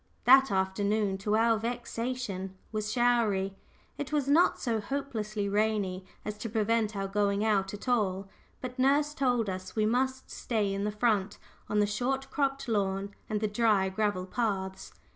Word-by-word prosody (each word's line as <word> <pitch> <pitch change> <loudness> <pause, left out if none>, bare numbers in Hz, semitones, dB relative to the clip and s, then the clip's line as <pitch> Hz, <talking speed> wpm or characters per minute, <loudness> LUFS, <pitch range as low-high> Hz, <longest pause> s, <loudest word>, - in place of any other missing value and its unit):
That 265 +2 +7
afternoon, 195 +1 0
to 210 +2 0
our 225 0 +3
vexation, 230 -4 -4
was 215 -1 -2
showery 225 -6 +2 0.5
it 290 -1 -4
was 290 -3 0
not 315 +5 +4
so 230 -3 0
hopelessly 215 -4 -3
rainy 200 -3 0 0.2
as 210 0 -5
to 230 - -4
prevent 220 0 +1
our 195 0 -2
going 200 +1 +1
out 195 -3 +2
at 205 +5 -9
all, 200 -6 +1 0.3
but 255 0 -6
nurse 290 +3 +3
told 245 -6 +1
us 185 -1 -5
we 215 -1 +2
must 260 +3 0
stay 210 -4 -1
in 200 +1 -2
the 210 - 0
front, 210 -2 +1 0.3
on 210 - 0
the 210 - +4
short 260 +6 -2
cropped 275 -1 -1
lawn 200 -2 -1 0.2
and 210 -1 -1
the 215 - +2
dry 210 -3 +2
gravel 190 -2 -1
paths. 190 -3 -2
215 Hz, 160 wpm, -29 LUFS, 200-245 Hz, 0.5 s, That